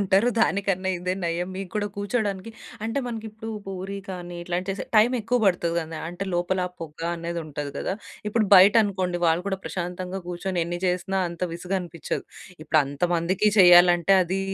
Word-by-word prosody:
ఉంటారు. 200 +4 +3
దానికన్నా 195 -3 +1
ఇదే 180 +1 -2
నయం 170 +2 -1
మీకు 195 -2 -6
కూడా 210 -1 0
కూర్చోవడానికి 205 0 -2 0.3
అంటే 225 +5 -1
మనకి 225 -2 -5
ఇప్పుడు 220 +1 -8 0.2
పూరి 195 +1 -5
కానీ 175 -1 -7
ఇట్లాంటి 180 +2 -3
చేసే 195 - -4
టైమెక్కువ 240 +2 +3
పడుతది 175 -3 +2
కదా! 160 -1 -6
అంటే 175 +3 -5
లోపల 175 +2 0 0.2
పొగ 160 -1 -8 0.2
అనేదుంటది 160 -4 -5
కదా! 190 - -2 0.3
ఇప్పుడు 215 0 +1
బయటనుకోండి 190 -2 +5
వాళ్ళు 165 +2 +2
కూడా 190 - -2
ప్రశాంతంగా 180 +1 -4
కూర్చొని 180 +1 -2
ఎన్ని 175 +1 -4
చేసినా 185 +2 0
అంత 170 +1 -9
విసుగనిపిచ్చదు. 175 -1 -4 0.4
ఇప్పుడంత 145 -2 +1
మందికీ 180 +5 +2
చేయాలంటే 175 0 +7
అది 185 +2 -2
185 Hz, 150 wpm, -25 LUFS, 175-195 Hz, 0.4 s, చేయాలంటే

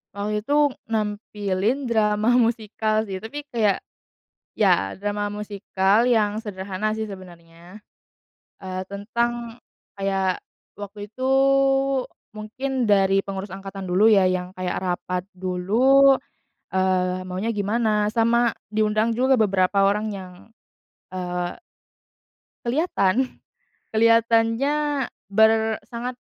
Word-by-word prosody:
Waktu 210 +1 -2
itu, 290 +3 +3 0.2
nampilin 210 +2 -2
drama 215 -1 +2
musikal 220 -1 0
sih, 195 -3 -5
tapi 280 +9 -7
kayak 215 -5 +1 0.7
ya, 95 +1 +2
drama 205 +1 -2
musikal 205 +1 0
yang 215 -3 +2
sederhana, 200 0 -3
sih, 220 - -2
sebenarnya. 175 -2 -12 0.8
E - - -12 0.3
tentang 235 +3 -3 0.4
kayak, 195 -2 -1 0.4
waktu 205 +1 -8
itu 240 +5 -9 1.1
mungkin 255 +5 -3
dari 195 -1 +4
pengurus 195 0 -6
angkatan 195 0 -7
dulu, 200 +5 +4
ya, 195 -3 +5
yang 180 0 -2
kayak 185 -1 -2
rapat 180 0 -2
dulu, 220 +10 +4 0.6
eee, 185 -1 +1
maunya 190 +5 -2
gimana. 210 0 +1
Sama 235 +1 +2 0.2
diundang 215 +1 +1
juga 260 +1 +3
beberapa 195 -1 +2
orang 210 +2 +1
yang, 185 -1 -9 0.8
eee 180 -1 -4 1.1
Kelihatan. 255 - 0 0.6
Kelihatannya 230 +6 +2 0.2
ber 220 +1 +3
sangat 245 +2 -5
210 Hz, 100 wpm, -23 LUFS, 190-230 Hz, 1.1 s, ya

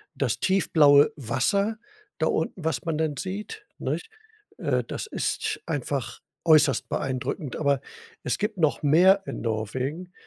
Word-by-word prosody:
das - - -1
tiefblaue 150 -6 +5
Wasser 155 - 0 0.4
da - - +2
unten, 180 - -2
was 160 -2 -2
man 160 -2 -1
dann 155 -3 -1
sieht, 210 - -6
nicht? 450 - -3 0.5
Äh, - - 0
das - - -5
ist 435 0 -2
einfach 140 -5 -3 0.3
äußerst 150 -5 +4
beeindruckend. 130 +1 -3
Aber 140 -3 +1 0.4
es 125 - -1
gibt 210 -1 -2
noch 155 -2 +1
mehr 185 +7 +5
in - - -5
Norwegen, 130 - -3
155 Hz, 135 wpm, -26 LUFS, 135-190 Hz, 0.5 s, tiefblaue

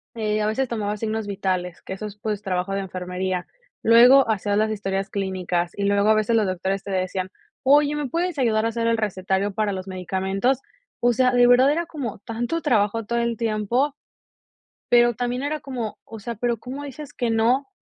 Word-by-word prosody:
eh, 215 -1 0
a 210 - +1
veces 260 +5 0
tomaba 210 -3 -2
signos 220 0 -3
vitales, 185 -3 -2
que - - -6
eso 210 +3 -5
es, 210 0 -11
pues, 210 -1 -3
trabajo 190 -1 -2
de 195 - 0
enfermería. 185 -1 -3 0.4
Luego, 245 +4 +7
hacías 205 -1 0
las 215 +1 +2
historias 195 -1 -3
clínicas, 185 -3 -2
y 200 - -1
luego 200 +1 +3
a 220 - +6
veces 215 +2 +1
los 215 -3 +3
doctores 190 +1 -2
te - - -8
decían: 185 0 -2 0.3
"Oye, 290 +2 +4
¿me 295 -1 -2
puedes 340 0 -1
ayudar 225 -3 +2
a - - +2
hacer 230 0 -1
el 230 0 +2
recetario 195 -1 -1
para 210 -1 0
los 185 0 -6
medicamentos?". 190 +6 -1 0.4
O 245 0 +4
sea, 255 +2 +3
de 245 0 +5
verdad 250 +3 +6
era 335 +2 0
como 280 -10 -5
tanto 240 +9 -2
trabajo 225 -4 +1
todo 235 +3 -1
el 235 -1 -1
tiempo, 230 +5 0 1.0
pero 240 0 +5
también 245 +3 -2
era 300 +1 -2
como, 245 -6 -5
o 225 - -9
sea, 235 +3 -5
¿pero 235 +2 -1
cómo 265 +6 -7
dices 285 +1 -9
que 240 -2 -1
no? 235 +5 +2
215 Hz, 200 wpm, -23 LUFS, 195-245 Hz, 1.0 s, Luego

